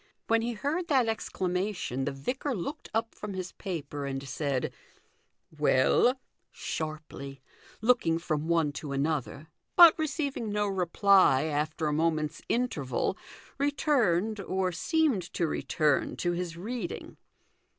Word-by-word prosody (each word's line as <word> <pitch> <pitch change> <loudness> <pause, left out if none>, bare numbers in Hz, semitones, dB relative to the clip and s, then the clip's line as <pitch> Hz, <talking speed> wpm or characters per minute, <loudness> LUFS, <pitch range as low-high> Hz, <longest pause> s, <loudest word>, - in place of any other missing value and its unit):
When 225 0 +3
he 235 +1 -2
heard 300 +10 -2
that 265 -5 +3
exclama 195 -2 -1
tion 135 -6 -3
the 145 - -1
vicar 250 - -3
looked 280 - -5
up 225 +1 -1
from 210 -2 -6
his 185 -1 -4
paper 145 -6 -5
and 135 0 -4
said, 140 -2 -2 0.4
" - - -44
Well? 150 - +4 0.2
" - - -49
sharply, 150 -4 -6 0.4
looking 220 -9 +3
from 155 -2 -2
one 165 -3 +2
to 145 -3 -5
another; 145 +1 -2 0.3
but 340 -3 +10
receiving 285 -7 -2
no 210 0 +1
reply 190 -5 +4
after 155 +1 -1
a 150 - +1
moment's 155 -1 0
interval 175 - 0 0.4
returned, 225 - +2
or 190 -1 -1
seemed 275 - +1
to 170 - +1
return, 150 -2 0
to 175 - -1
his 175 -1 -3
reading. 230 +7 -5
180 Hz, 135 wpm, -29 LUFS, 150-230 Hz, 0.4 s, but